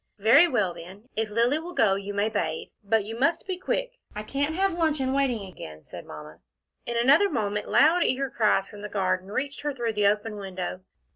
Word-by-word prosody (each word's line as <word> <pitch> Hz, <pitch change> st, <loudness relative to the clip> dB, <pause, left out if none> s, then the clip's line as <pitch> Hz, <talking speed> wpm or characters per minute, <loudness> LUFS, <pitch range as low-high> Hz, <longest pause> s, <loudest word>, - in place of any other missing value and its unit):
"Very 230 Hz, -, +6 dB
well, 210 Hz, -, 0 dB
then 185 Hz, +8 st, -12 dB
if 220 Hz, 0 st, -1 dB
Lilly 235 Hz, +7 st, +2 dB
will 345 Hz, +2 st, -8 dB
go 215 Hz, -4 st, +4 dB
you 200 Hz, +1 st, -4 dB
may 205 Hz, +1 st, 0 dB
bathe, 170 Hz, -8 st, -3 dB
but 210 Hz, 0 st, +1 dB
you 225 Hz, +2 st, -6 dB
must 330 Hz, +8 st, +1 dB
be 380 Hz, -1 st, -2 dB
quick. -, -, -3 dB, 0.2 s
I 210 Hz, -, -4 dB
can't 285 Hz, +7 st, -2 dB
have 385 Hz, 0 st, +1 dB
luncheon 310 Hz, -6 st, 0 dB
kept 265 Hz, -, 0 dB
waiting 250 Hz, -7 st, 0 dB
again," 80 Hz, -, -10 dB
said -, -, -10 dB
Mamma. 75 Hz, +1 st, -10 dB, 0.5 s
In 235 Hz, 0 st, -2 dB
another 280 Hz, +12 st, +5 dB
moment 210 Hz, -, -2 dB
loud 330 Hz, +4 st, +5 dB
eager 265 Hz, 0 st, 0 dB
cries 210 Hz, -3 st, +2 dB
from 205 Hz, -, -11 dB
the 210 Hz, -, -6 dB
garden 185 Hz, -2 st, -1 dB
reached 280 Hz, +5 st, -3 dB
her 295 Hz, -1 st, -3 dB
through 235 Hz, -3 st, -2 dB
the 210 Hz, -1 st, +2 dB
open 210 Hz, +1 st, 0 dB
window. 185 Hz, -2 st, -5 dB
225 Hz, 210 wpm, -26 LUFS, 200-280 Hz, 0.5 s, Very